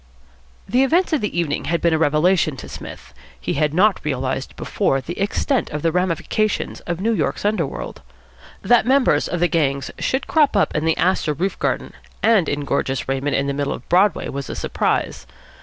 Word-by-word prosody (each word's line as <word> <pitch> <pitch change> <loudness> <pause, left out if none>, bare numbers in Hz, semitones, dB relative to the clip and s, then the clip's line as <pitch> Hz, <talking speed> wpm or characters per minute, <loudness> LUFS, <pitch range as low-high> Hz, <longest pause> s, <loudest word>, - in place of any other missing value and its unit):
The 245 +6 +2
events 330 +6 +2
of 305 - +2
the 210 -4 -2
evening 155 -4 -1
had 170 +1 0
been 170 -1 +2
a - - +3
revelation 155 0 +2
to - - -8
Psmith. - - -10 0.3
He - - -2
had 150 +1 +1
not 190 +5 +3
realised 135 -2 -3
before 135 - 0
the 170 +6 -7
extent 220 +6 0
of 150 -1 -5
the 165 - +2
ramifications 185 +4 -1
of 175 -1 -2
New 225 +4 +1
York's 210 - -1
underworld. 215 +1 -2 0.6
That 240 -1 +4
members 260 - +3
of 175 - -3
the 175 - +3
gangs 140 -5 0
should 265 - -1
crop 295 -8 +3
up 200 - +2
in 155 +1 0
the 160 - +2
Astor 180 -4 +1
roof 190 +7 -2
garden - - -2 0.3
and 215 -8 +4
in 145 0 -1
gorgeous 135 -1 -1
raiment 135 +2 -1
in 140 - +1
the 140 - -1
middle 140 0 -1
of - - -10
Broadway 185 +1 +3
was 140 0 -5
a - - -4
surprise. - - -1
170 Hz, 190 wpm, -21 LUFS, 145-210 Hz, 0.6 s, That